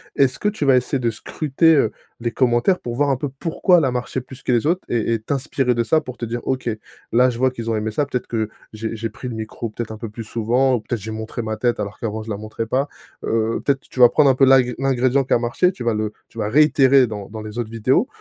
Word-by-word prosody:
Est-ce 135 -2 +2
que 210 - +1
tu 205 -8 -3
vas 135 -2 +5
essayer 125 +2 +1
de 120 -2 0
scruter, 155 +7 +2
heu, 115 -7 +3 0.3
les 120 0 -2
commentaires 125 +9 +2
pour 120 -1 -5
voir 145 +1 +2
un 135 - +1
peu 145 - -3
pourquoi 165 +6 +2
elle 150 - +1
a 130 - +1
marché 125 +1 -3
plus 130 +1 -12
que - - 0
les 120 0 +2
autres 180 +3 +1
et 115 -1 0
et 115 - 0
t'inspirer 135 0 0
de 115 - +1
ça 155 +6 +3
pour 125 -4 -9
te 120 - -4
dire: 120 +1 -4
«OK, 130 -2 -1 0.4
là 125 +2 +4
je 115 - -7
vois 130 +1 +4
qu'ils 115 -2 -5
ont - - 0
aimé 110 0 -1
ça. 145 +7 0
Peut-être 130 -3 -4
que, 110 -2 -2 0.2
j'ai 110 +1 -5
j'ai 115 +1 -3
pris 125 - -8
le 120 - -4
micro 110 +1 -5
peut-être 110 +1 -6
un 110 - -7
peu 115 -1 -6
plus 115 +2 -7
souvent 120 +4 +1
ou - - -1
peut-être 110 +1 -4
j'ai 110 +2 -6
montré 110 +2 -5
ma 110 -1 -3
tête 120 +1 0
alors 100 0 -4
qu'avant 110 -1 -3
je 115 - -10
la 105 - -2
montrais 110 +1 -5
pas». 135 +5 0 0.4
Heu, 115 0 0
peut-être 135 -1 +1
tu 130 - -9
vas 120 - +10
prendre 150 -3 +4
un 130 - +4
peu 135 - +5
l'ingr 130 -2 +5
l'ingrédient 135 0 +2
qui - - 0
a - - +4
marché 120 +10 +1
tu 120 - -7
vas 115 - +1
le 105 0 -2 0.2
tu - - -18
vas 105 -1 -1
réitérer 135 0 +5
dans 105 -4 -6
dans 110 +1 -7
les 110 +2 -8
autres 115 -2 -3
vidéos 115 - +1
120 Hz, 280 wpm, -21 LUFS, 110-135 Hz, 0.4 s, vas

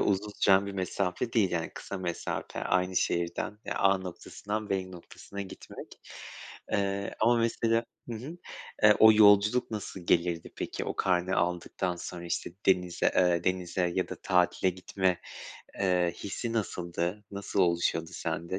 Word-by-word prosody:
uzun 105 +1 0
süren 95 0 +5
bir 100 - -5
mesafe 95 +3 -2
değil. 105 -6 +3
Yani, 85 -2 -2
kısa 100 - -6
mesafe 85 -2 -4
aynı 90 0 +1
şehirden 85 +5 -1 0.2
A 95 -1 +4
noktasından 100 +3 -5
B 95 -1 -1
noktasına 95 +2 -10
gitmek. 95 - -11 0.7
Iıı, 100 0 0
ama 120 +2 +4
mesela 115 0 +1 0.2
Hı 120 - -4
hı. 140 +10 -7 0.5
Iıı, 105 - +9
o 110 0 +9
yolculuk 105 +3 +5
nasıl 105 -3 -5
gelirdi 85 -1 0
peki? - - -4
O - - -4
karne 90 0 +1
aldıktan 90 +1 -1
sonra 85 0 -7
işte 85 - -3 0.2
denize, 90 -2 +2
ııı, 85 -1 +3
denize 90 -1 0
ya 95 - 0
da - - -6
tatile 90 0 +2
gitme, 90 0 -1 0.6
ııı, 90 -2 +2
hissi 110 +6 -5
nasıldı? 90 -2 -2
Nasıl 100 0 -2
oluşuyordu 85 -2 +1
sende 85 +2 -3
95 Hz, 140 wpm, -29 LUFS, 90-100 Hz, 0.7 s, Iıı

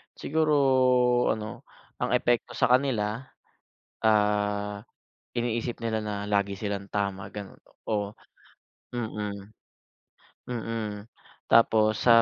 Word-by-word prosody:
Siguro 155 0 +1 0.8
ano 110 -1 -7 0.3
ang - - -1
epekto 120 0 +1
sa - - +3
kanila, 120 -5 +2 0.9
ah, 105 -1 +2 0.5
iniisip 120 0 -1
nila 110 -1 -1
na 100 -1 -3
lagi 100 -1 +1
silang 100 -1 -4
tama 100 -1 -2
ganun. 100 -2 -8 0.3
Oh, 105 -2 -1 0.8
mm, 105 -3 -4 1.0
mm, 110 -3 -4 0.4
tapos 110 -2 +5
sa 115 -1 +8
105 Hz, 95 wpm, -27 LUFS, 105-115 Hz, 1.0 s, sa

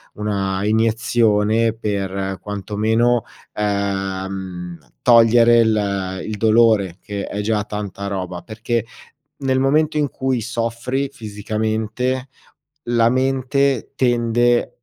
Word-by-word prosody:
una 100 -2 -2
iniezione 110 0 +2
per, 95 -3 -3
quanto 105 +1 -6
meno, 115 +3 +2 0.3
uhm, 95 -3 -3 0.2
togliere 115 0 +6
il 100 -4 0
il 110 -1 -4
dolore, 110 -4 +3
che 100 -1 -5
è 105 - -4
già 105 0 0
tanta 100 -1 -5
roba. 90 -3 -4
Perché, 115 +1 -2 0.6
nel 130 -2 0
momento 150 +4 +2
in 145 -2 +1
cui 130 -3 -1
soffri 120 +4 -2
fisicamente, 110 +3 -3 0.6
la 115 -1 +2
mente 135 +1 0
tende 120 -1 +2
110 Hz, 100 wpm, -20 LUFS, 100-120 Hz, 0.6 s, togliere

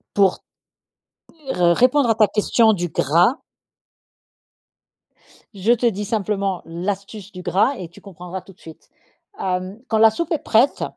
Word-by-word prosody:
pour 195 -2 +3 1.1
r 175 -1 +2
répondre 255 +3 +3
à 225 - +3
ta 215 -1 +4
question 220 +2 +2
du 175 -3 -2
gras 170 - +2 2.2
je 200 +3 0
te 240 0 -1
dis 210 -3 0
simplement 200 -3 -2
l'astuce 195 +4 -6
du 180 - -9
gras 205 +10 +1
et 185 - -7
tu 175 - -17
comprendras 180 -1 -9
tout 195 - -16
de - - -34
suite. 160 -1 -14 0.5
Hem, 185 +2 -3
quand 220 - 0
la 220 0 +6
soupe 335 +9 -4
est 320 - 0
prête 240 +5 +2
200 Hz, 150 wpm, -20 LUFS, 180-225 Hz, 2.2 s, la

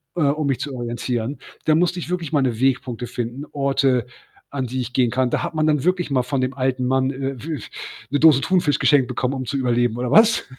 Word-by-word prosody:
äh, 175 - -1
um 145 +1 +1
mich 135 -3 0
zu 145 - -4
orientieren. 120 +1 -3 0.3
Da 155 - +4
musste 175 +2 +1
ich 170 - -6
wirklich 175 -4 -3
meine 130 -6 +1
Wegpunkte 125 -2 0
finden, 120 +5 -5
Orte, 135 -3 +1 0.4
an 135 -3 -3
die 130 +2 -3
ich 125 0 -6
gehen 125 -3 +3
kann. 130 0 0
Da - - 0
hat - - -4
man 155 0 +1
dann 150 -3 +2
wirklich 180 -3 0
mal 130 -2 +3
von 135 +2 -2
dem 130 +1 -1
alten 130 -1 -1
Mann, 130 +1 +1
äh, 135 0 -4
w 155 -3 -4 0.5
'ne 145 - +1
Dose 150 -3 +6
Thunfisch 170 -6 +2
geschenkt 135 -4 +4
bekommen, 125 +1 -2
um 130 -1 -4
zu 140 - -2
überleben 120 -2 +1
oder 125 0 -2
was? 225 +4 +5
135 Hz, 225 wpm, -21 LUFS, 125-150 Hz, 0.5 s, Dose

